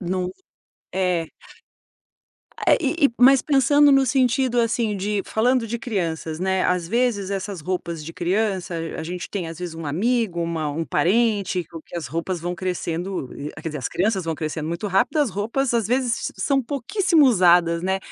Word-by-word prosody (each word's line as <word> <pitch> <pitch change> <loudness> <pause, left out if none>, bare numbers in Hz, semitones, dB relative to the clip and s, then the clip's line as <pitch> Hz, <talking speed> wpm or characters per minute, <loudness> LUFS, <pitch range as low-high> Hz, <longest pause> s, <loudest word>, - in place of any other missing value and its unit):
Num 180 0 -2 0.6
é. 180 -3 0 1.3
Ah, - - +3
e 330 -4 +3
e 240 - -7
mas 265 +1 +7
pensando 285 +1 +4
no 270 -1 +4
sentido, 250 0 +2
assim, 225 -2 0
de 200 +1 -1
falando 240 +2 +1
de 235 +2 -3
crianças, 165 - -3
né, 190 0 +1
às 180 -2 +1
vezes 225 -3 0
essas 195 -2 -4
roupas 170 -1 -4
de 165 - -7
criança, 185 0 -1 0.2
a - - -4
gente 175 +2 -5
tem, 190 -5 -4
às 165 0 -8
vezes, 175 -2 -5
um 165 -1 -7
amigo, 195 - 0
uma 165 -3 -2
um 160 +3 -3
parente 200 +2 +1 0.2
que - - -9
as 170 - -4
roupas 170 +2 -3
vão 175 +2 -3
crescendo 180 -3 -3 0.3
quer - - -3
dizer, 150 -1 -5
as 130 - -3
crianças 190 -1 0
vão 165 -1 -2
crescendo 155 0 -4
muito 170 +5 -3
rápido, 200 +10 +1
as 290 -3 +3
roupas, 235 +6 -1
às 225 -3 +1
vezes, 245 -1 0
são 275 -2 +1
pouquíssimo 315 - +2
usadas, 175 -6 +4
né. 190 +1 0
190 Hz, 170 wpm, -23 LUFS, 170-235 Hz, 1.3 s, mas